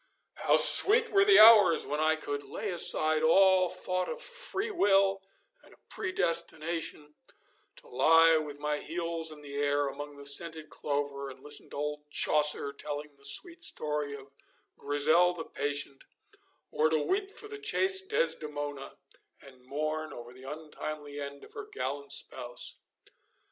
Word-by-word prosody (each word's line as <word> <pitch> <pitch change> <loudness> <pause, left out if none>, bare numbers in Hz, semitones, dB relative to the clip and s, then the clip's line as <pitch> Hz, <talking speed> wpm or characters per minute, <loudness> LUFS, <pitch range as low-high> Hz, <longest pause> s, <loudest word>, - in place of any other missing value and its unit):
How - - +1
sweet 460 +3 +5
were 390 0 +4
the 400 -1 +5
hours 215 -6 +7
when 150 +1 -4
I 155 +1 +2
could 145 -2 -5
lay 205 +6 -6
aside 155 -2 +3
all 185 +2 +4
thought 185 +1 -3
of 485 - -6
freewill 355 - 0 0.4
and - - -20
of - - -40
predestination, 165 - -2 0.6
to - - -17
lie 165 - +4
with 150 -2 -6
my 150 0 -3
heels 165 0 -3
in 150 -1 -13
the 140 -1 -11
air 145 0 0
among 145 +1 -8
the 140 - -12
scented 155 +2 +2
clover, 140 -1 -4
and 130 0 -14
listen 150 0 -3
to - - -11
old 150 0 -5
Chaucer 150 -1 +3
telling 145 0 -7
the 140 0 -16
sweet 340 - +2
story 150 - +1
of 135 0 -14 0.4
Grisel 155 +5 +1
the 160 - -7
patient, 140 -1 -4 0.7
or 155 +1 +1
to 160 - +1
weep 385 - -2
for 425 +1 -5
the 425 0 -9
chaste 385 -2 +1
Desdemona, 145 - -2 0.4
and 130 -2 -18
mourn 155 +3 -4
over 120 0 -11
the 130 +2 -10
untimely 150 -1 -8
end 140 0 -8
of - - -14
her 415 - -8
gallant 140 - -5
spouse. 120 -3 -4
155 Hz, 150 wpm, -29 LUFS, 145-185 Hz, 0.7 s, hours